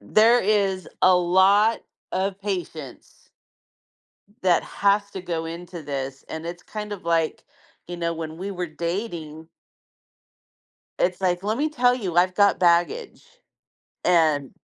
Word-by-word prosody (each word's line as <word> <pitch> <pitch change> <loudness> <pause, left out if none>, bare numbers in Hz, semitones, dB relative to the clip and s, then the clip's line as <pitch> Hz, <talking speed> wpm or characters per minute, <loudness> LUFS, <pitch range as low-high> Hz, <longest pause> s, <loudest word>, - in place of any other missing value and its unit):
there 220 - +4
is 195 -2 +1
a 185 0 +6
lot 190 +5 +4 0.3
of 195 +1 -1
patience 170 -9 -6 1.1
that 180 -2 +3
has 200 0 +1
to 190 - -6
go 165 -2 -3
into 170 +1 -7
this, 135 -2 -5
and 160 +1 -6
it's 175 +1 -7
kind 210 -1 -7
of, 190 - -9
like, 165 -1 0 0.4
you 175 - -6
know, 170 -1 -1
when 160 0 -6
we 195 +2 -5
were 180 -2 -4
dating 170 -2 -5 1.5
it's 180 +1 0
like, 180 -1 0
"Let 215 +3 -1
me 305 +2 +1
tell 245 -4 +3
you, 190 -9 -4
I've 185 +1 +4
got 200 0 +4
baggage," 175 - +1 0.8
and 155 -6 +2
180 Hz, 135 wpm, -24 LUFS, 165-200 Hz, 1.5 s, a